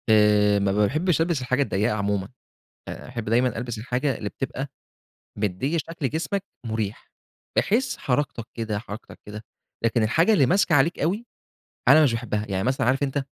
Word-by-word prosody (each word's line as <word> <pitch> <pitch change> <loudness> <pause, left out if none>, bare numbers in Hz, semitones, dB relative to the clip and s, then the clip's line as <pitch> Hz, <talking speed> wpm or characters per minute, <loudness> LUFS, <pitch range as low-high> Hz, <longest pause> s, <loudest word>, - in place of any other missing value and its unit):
آآ 105 -1 +5
ما 100 -1 +1
باحبّش 150 - +2
ألبس 165 -4 +1
الحاجة 130 +2 0
الضيّقة 105 -4 +1
عمومًا. 100 -1 -1 0.6
باحب 120 -3 -6
دايمًا 120 +2 +2
ألبس 120 0 -4
الحاجة 125 +5 -1
اللي 105 - -4
بتبقى 135 +3 -4 0.7
مديِّة 105 - -1
شكل 160 -3 -3
جسمك 175 - -2 0.2
مُريح، 110 -2 -4 0.5
بحيث 235 +6 +1
حركتك 125 -3 -1
كده، 110 -3 -3
حركتك 105 0 -9
كده، 105 +1 -8 0.4
لكن 115 0 +2
الحاجة 165 - +3
اللي 145 -10 +5
ماسكة 180 +3 +3
عليك 145 +5 +3
أوي، 195 +10 0 0.6
أنا 150 +4 +8
مش 135 -6 +3
باحبها. 110 -2 -2
يعني 95 -1 -1
مثلًا 130 -1 +1
عارف 135 +3 +2
أنت 140 0 -1
125 Hz, 155 wpm, -24 LUFS, 105-145 Hz, 0.7 s, أنا